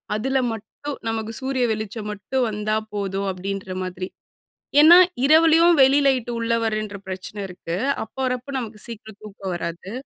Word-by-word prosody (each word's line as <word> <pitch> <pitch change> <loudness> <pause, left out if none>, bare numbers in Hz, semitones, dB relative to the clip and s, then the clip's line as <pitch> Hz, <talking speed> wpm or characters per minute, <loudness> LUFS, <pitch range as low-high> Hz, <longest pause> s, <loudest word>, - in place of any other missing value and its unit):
அதுல 265 +5 0 0.2
மட்டும் 225 +6 -7
நமக்கு 225 -1 -2
சூரிய 260 -1 -1
வெளிச்சம் 215 0 -4
மட்டும் 245 +5 -2
வந்தா 215 0 -1 0.2
போதும் 200 -1 -2
அப்படின்ற 190 +1 -5
மாதிரி. 185 0 -5 0.7
ஏன்னா, 330 +3 +9 0.3
இரவுலயும் 325 +3 +6
வெளி 270 +2 +5
லைட் 255 -3 +1
உள்ளே 230 0 +1
வரேன்ற 215 -2 -2
பிரச்சனை 190 +2 -6
இருக்கு. 175 -2 -5 0.3
அப்போ 220 - -12
வரப்போ 255 +1 -3
நமக்கு 220 -3 -7
சீக்கிரம் 220 -2 -10
தூக்கம் 195 -3 -6
வராது. 170 +2 -5
215 Hz, 145 wpm, -23 LUFS, 195-255 Hz, 0.7 s, ஏன்னா